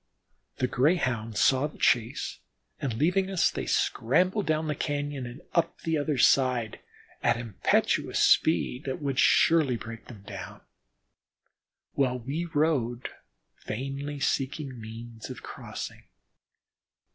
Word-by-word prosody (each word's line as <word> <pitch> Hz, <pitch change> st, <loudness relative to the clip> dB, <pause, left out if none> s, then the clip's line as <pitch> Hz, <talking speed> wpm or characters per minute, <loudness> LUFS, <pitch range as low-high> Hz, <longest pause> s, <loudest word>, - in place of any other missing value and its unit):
The 130 Hz, -, +1 dB
Greyhounds 125 Hz, -, +1 dB
saw 135 Hz, +2 st, +4 dB
the 150 Hz, -, -15 dB
chase, 120 Hz, +2 st, +1 dB, 0.4 s
and 125 Hz, -5 st, -2 dB
leaving 180 Hz, +8 st, +2 dB
us 190 Hz, -3 st, +2 dB
they -, -, -4 dB
scrambled 185 Hz, -, +1 dB
down 155 Hz, 0 st, +1 dB
the 150 Hz, -, -1 dB
cañon 145 Hz, -3 st, -3 dB
and 130 Hz, +8 st, -11 dB
up 170 Hz, -1 st, +1 dB
the 165 Hz, -1 st, 0 dB
other 150 Hz, -1 st, 0 dB
side 125 Hz, -3 st, +3 dB, 0.4 s
at -, -, +3 dB
impetuous 115 Hz, -5 st, +1 dB
speed 150 Hz, -4 st, +3 dB
that 130 Hz, -1 st, -3 dB
would 140 Hz, -3 st, -1 dB
surely 155 Hz, -7 st, +4 dB
break 115 Hz, +1 st, -9 dB
them 105 Hz, -5 st, -12 dB
down, -, -, -8 dB, 1.3 s
while 130 Hz, -2 st, +1 dB
we 140 Hz, +8 st, -3 dB
rode, 145 Hz, -7 st, 0 dB, 0.6 s
vainly 140 Hz, +5 st, -4 dB
seeking 135 Hz, -1 st, -2 dB
means 115 Hz, +1 st, -9 dB
of -, -, -8 dB
crossing. -, -, -7 dB
135 Hz, 120 wpm, -28 LUFS, 120-155 Hz, 1.3 s, saw